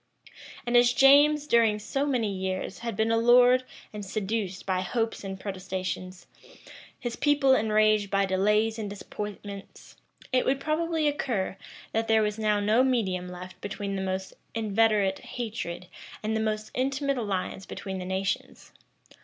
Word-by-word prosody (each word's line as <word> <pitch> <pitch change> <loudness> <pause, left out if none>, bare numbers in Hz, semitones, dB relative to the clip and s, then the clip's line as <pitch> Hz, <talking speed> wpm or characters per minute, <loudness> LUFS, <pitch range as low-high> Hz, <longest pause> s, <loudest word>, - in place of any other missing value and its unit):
[*] - - -16
And 240 0 0
as 240 0 +6
James, 290 +3 +6
during 230 -5 +3
so 275 +7 -2
many 230 -7 0
years, 190 0 -3
had 230 -2 -4
been 220 +2 +1
allured 245 +2 +5 0.3
and 210 -1 -6
seduced 195 -1 -3
by 185 -1 0
hopes 225 +4 -2
and 190 -1 -6
protestations, 185 -2 -5 0.7
his 240 -2 -4
people 290 -2 +3
enraged 215 -3 +3
by 195 0 +2
delays 210 +4 +1
and 210 -2 -4
disappointments, 205 0 -8 0.4
it 255 - +4
would 270 +1 +1
probably 315 +1 0
occur, 235 -10 -1 0.4
that 225 0 -1
there 220 -1 +4
was 210 +1 -2
now 210 -1 +2
no 215 +5 +3
medium 195 -9 0
left 180 +1 -10
between 205 -1 -4
the 190 - -2
most 190 0 -3 0.2
inveterate 215 -3 +2
hatred 215 -7 -5 0.4
and 220 +1 -1
the - - +1
most 215 0 -2
intimate 275 +1 0
alliance 195 -3 -3
between 190 -1 -5
the 180 - -5
nations. 190 +1 -3
215 Hz, 150 wpm, -27 LUFS, 195-240 Hz, 0.7 s, as